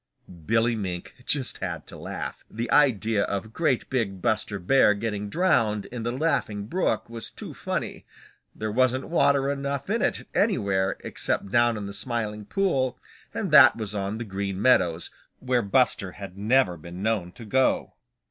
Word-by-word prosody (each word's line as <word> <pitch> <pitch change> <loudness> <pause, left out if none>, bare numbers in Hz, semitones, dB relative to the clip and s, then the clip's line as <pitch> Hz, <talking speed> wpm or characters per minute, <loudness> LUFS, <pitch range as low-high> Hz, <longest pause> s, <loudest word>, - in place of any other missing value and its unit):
Billy 115 +1 +2
Mink 90 -5 -5
just 140 -4 +1
had - - -4
to - - -10
laugh. - - -6
The 115 +2 -4
idea 115 -7 +3
of 105 +2 -4
great 150 -5 0
big 110 -7 -1
Buster 110 0 0
Bear 105 +3 +4
getting 105 -1 -3
drowned 115 - +2
in 120 -1 -7
the 120 +1 -2
Laughing 125 -8 -1
Brook 180 - -1
was 115 -1 -4
too - - -9
funny. - - -4 0.5
There 110 0 -3
wasn't 130 +4 +1
water 140 -4 +3
enough 140 +4 -3
in 230 - +1
it - - -1
anywhere 100 - +1
except 100 - -2
down 120 -1 +3
in 105 - -5
the 100 - -6
Smiling 110 -4 -3
Pool, 135 - 0 0.3
and - - -3
that - - +9
was 110 -3 -4
on 100 +1 -3
the 120 - -4
Green 100 -1 -4
Meadows, 90 -8 +2 0.3
where 125 -1 +1
Buster 100 -3 +1
had 100 -3 -9
never 105 -3 +2
been 85 +4 -9
known 105 -5 0
to 115 - -11
go. 130 +5 +1
115 Hz, 165 wpm, -26 LUFS, 100-130 Hz, 0.5 s, that